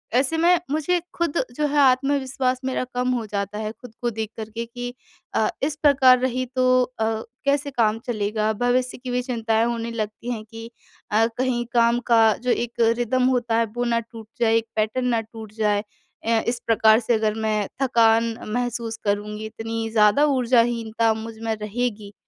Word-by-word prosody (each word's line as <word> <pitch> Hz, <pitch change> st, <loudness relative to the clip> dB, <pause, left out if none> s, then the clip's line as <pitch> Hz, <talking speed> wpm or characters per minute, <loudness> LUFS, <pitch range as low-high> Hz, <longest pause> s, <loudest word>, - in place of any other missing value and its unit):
ऐसे 270 Hz, +6 st, +2 dB
में 345 Hz, +2 st, +4 dB
मुझे 315 Hz, +4 st, +1 dB
खुद 340 Hz, -2 st, -1 dB, 0.2 s
जो 300 Hz, -, 0 dB
है, 295 Hz, +1 st, -1 dB
आत्मविश्वास 265 Hz, -1 st, +2 dB
मेरा 260 Hz, -1 st, -1 dB
कम 250 Hz, 0 st, 0 dB
हो 235 Hz, -3 st, -2 dB
जाता 200 Hz, 0 st, -4 dB
है, 215 Hz, 0 st, -3 dB
खुद 230 Hz, +1 st, -14 dB
को 240 Hz, -, 0 dB
देख 220 Hz, -1 st, -4 dB
कर 220 Hz, -1 st, -6 dB
के 230 Hz, +2 st, -5 dB
कि 245 Hz, +1 st, -7 dB, 0.4 s
अ, 220 Hz, -, +2 dB, 0.2 s
"इस 290 Hz, +1 st, 0 dB
प्रकार 265 Hz, -3 st, +6 dB
रही, 255 Hz, 0 st, -1 dB
तो 255 Hz, 0 st, +2 dB
अ, 245 Hz, -3 st, -3 dB, 0.4 s
कैसे 285 Hz, 0 st, +1 dB
काम 225 Hz, -4 st, +1 dB
चलेगा?" 215 Hz, -2 st, -1 dB
भविष्य 250 Hz, +1 st, +1 dB
की 250 Hz, 0 st, -6 dB
भी 250 Hz, 0 st, 0 dB
चिंताएँ 225 Hz, -3 st, 0 dB
होने 235 Hz, -1 st, -2 dB
लगती 220 Hz, +1 st, -4 dB
हैं 220 Hz, -3 st, -4 dB
कि 225 Hz, +1 st, -10 dB, 0.4 s
अ, 220 Hz, +2 st, +4 dB
कहीं 250 Hz, -1 st, 0 dB
काम 235 Hz, 0 st, +3 dB
का 230 Hz, -1 st, +6 dB, 0.2 s
जो 250 Hz, -, +1 dB
एक 240 Hz, 0 st, -1 dB, 0.3 s
रिदम 245 Hz, +1 st, +1 dB
होता 235 Hz, -2 st, 0 dB
है, 230 Hz, -, +3 dB
वो 245 Hz, -, -1 dB
ना 235 Hz, -1 st, +1 dB
टूट 225 Hz, -1 st, -11 dB
जाए, 225 Hz, -1 st, +4 dB
एक 230 Hz, -, -1 dB
पैटर्न 220 Hz, +4 st, 0 dB
ना 235 Hz, -2 st, +1 dB
टूट 220 Hz, -1 st, -11 dB
जाए। 210 Hz, -1 st, +1 dB, 0.4 s
अ, 230 Hz, 0 st, +3 dB
इस 235 Hz, 0 st, 0 dB
प्रकार 220 Hz, -1 st, +5 dB
से 240 Hz, 0 st, 0 dB
अगर 215 Hz, -1 st, +1 dB
मैं 210 Hz, -2 st, 0 dB
थकान 230 Hz, -3 st, +3 dB, 0.2 s
महसूस 240 Hz, -2 st, -2 dB
करूँगी, 210 Hz, +1 st, -2 dB
इतनी 225 Hz, +1 st, -4 dB
ज़्यादा 220 Hz, +6 st, +4 dB
ऊर्जाहीनता 235 Hz, -4 st, +2 dB
मुझ 220 Hz, 0 st, -7 dB
में 225 Hz, -1 st, -1 dB
रहेगी, 210 Hz, -1 st, -4 dB
235 Hz, 185 wpm, -23 LUFS, 220-255 Hz, 0.4 s, प्रकार